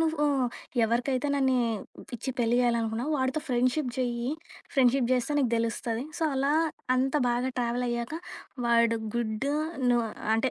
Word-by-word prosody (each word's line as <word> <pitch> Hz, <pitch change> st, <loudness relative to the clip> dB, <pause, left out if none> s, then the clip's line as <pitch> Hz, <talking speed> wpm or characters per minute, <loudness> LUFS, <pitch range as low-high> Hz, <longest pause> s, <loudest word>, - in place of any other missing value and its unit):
నువ్వు 315 Hz, -2 st, +1 dB, 0.6 s
ఎవరికైతే 245 Hz, +4 st, 0 dB
నన్ను 265 Hz, -2 st, +2 dB, 0.6 s
ఇచ్చి 260 Hz, +4 st, -4 dB
పెళ్లి 235 Hz, 0 st, +2 dB
జేయాలనుకున్నావో 235 Hz, +2 st, 0 dB
వాడితో 260 Hz, +4 st, 0 dB
ఫ్రెండ్‌‌షిప్ 255 Hz, +2 st, +1 dB
జెయ్యి. 245 Hz, 0 st, -1 dB, 0.4 s
ఫ్రెండ్‌షిప్ 255 Hz, -1 st, +4 dB
జేస్తే 255 Hz, +3 st, +1 dB
నీకు 260 Hz, -5 st, +2 dB
దెలుస్తది. 230 Hz, +1 st, -1 dB, 0.2 s
సో -, -, -2 dB
అలా 275 Hz, +1 st, +1 dB, 0.4 s
అంత 265 Hz, +2 st, +1 dB
బాగా 245 Hz, +2 st, 0 dB
ట్రావెలయ్యాక 240 Hz, +1 st, -1 dB, 0.5 s
వాడు 235 Hz, -1 st, +4 dB, 0.2 s
గుడ్డు 235 Hz, +4 st, -1 dB, 0.4 s
ను 245 Hz, -1 st, +4 dB, 0.4 s
అంటే 240 Hz, +3 st, +1 dB
245 Hz, 125 wpm, -28 LUFS, 235-265 Hz, 0.6 s, ఫ్రెండ్‌షిప్